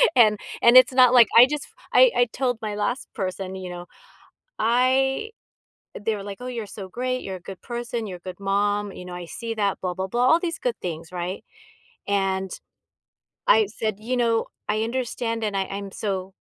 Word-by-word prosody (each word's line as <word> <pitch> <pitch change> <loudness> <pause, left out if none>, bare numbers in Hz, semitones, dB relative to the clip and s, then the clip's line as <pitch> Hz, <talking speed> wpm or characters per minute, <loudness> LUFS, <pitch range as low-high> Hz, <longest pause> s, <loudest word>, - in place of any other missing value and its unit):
And 215 -4 +5 0.2
and 235 +1 +6
it's 255 - +8
not 255 -1 +6
like, 240 -3 +8
I 240 - +11
just 295 -1 -3 0.3
I - - +7
I 245 - +5
told 250 -3 0
my 210 -1 -2
last 225 +5 -2
person, 190 -2 -4
you 185 -1 -6
know, 175 0 -7 0.7
I 260 - +2 0.6
they 215 +2 -2
were 200 - -7
like, 200 -1 -7
"Oh, 250 - -7
you're 235 -4 -4
so 200 -1 -8
great. 255 +5 -2
You're 190 -1 -5
a - - -12
good 190 - -8
person. 240 -1 -4
You're 185 -3 -6
a - - -33
good 185 - -8
mom," 205 +1 0
you 180 - -9
know, 180 0 -8
"I 175 -1 -7
see 230 +6 -5
that. 205 -3 0
Blah, 180 -1 -2
blah, 190 +1 -3
blah," 240 +5 +1
all 325 - +5
these 340 -1 -3
good 245 -2 -2
things, 165 -2 -5
right? 180 +2 -4 0.7
And, 190 -1 0 1.0
I 220 -2 +5
said, 215 0 -3
"You 250 +4 -2
know, 230 -2 +1 0.2
I 215 +1 +1
understand, 230 -1 -2
and 210 -2 -1
I 195 - 0
I'm 195 0 -6
so 190 -2 -4
215 Hz, 200 wpm, -24 LUFS, 190-245 Hz, 1.0 s, I